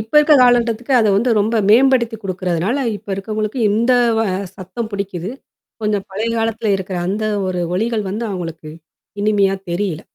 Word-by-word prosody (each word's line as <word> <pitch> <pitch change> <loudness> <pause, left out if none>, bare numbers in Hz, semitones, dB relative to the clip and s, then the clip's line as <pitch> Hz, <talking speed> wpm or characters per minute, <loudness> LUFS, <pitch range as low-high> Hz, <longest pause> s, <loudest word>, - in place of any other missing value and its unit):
இப்ப 220 +7 -9
இருக்க 300 0 +5
காலகட்டத்துக்கு 245 0 +3
அத 220 -2 +3
வந்து 240 +5 +1
ரொம்ப 215 +3 +1 0.2
மேம்படுத்தி 240 -1 +4
குடுக்குறதுனால 185 - -1
இப்ப - - -18
இருக்கவங்களுக்கு 215 +4 -3
இந்த 230 +5 +2 0.3
வ - - +2 0.3
சத்தம் 195 +5 -6
புடிக்குது. 195 -2 -4 0.5
கொஞ்சம் 210 -2 -1
பழைய 215 +4 -2
காலத்துல 225 -1 0
இருக்கிற 190 -1 -5
அந்த 210 +3 -2 0.2
ஒரு 180 -1 -2 0.2
ஒலிகள் 220 -1 -1
வந்து 220 +4 -3
அவங்களுக்கு? 165 -4 -6 0.5
இனிமையா 200 -2 +2 0.2
தெரியல. 175 -2 -2
210 Hz, 150 wpm, -18 LUFS, 190-230 Hz, 0.5 s, இருக்க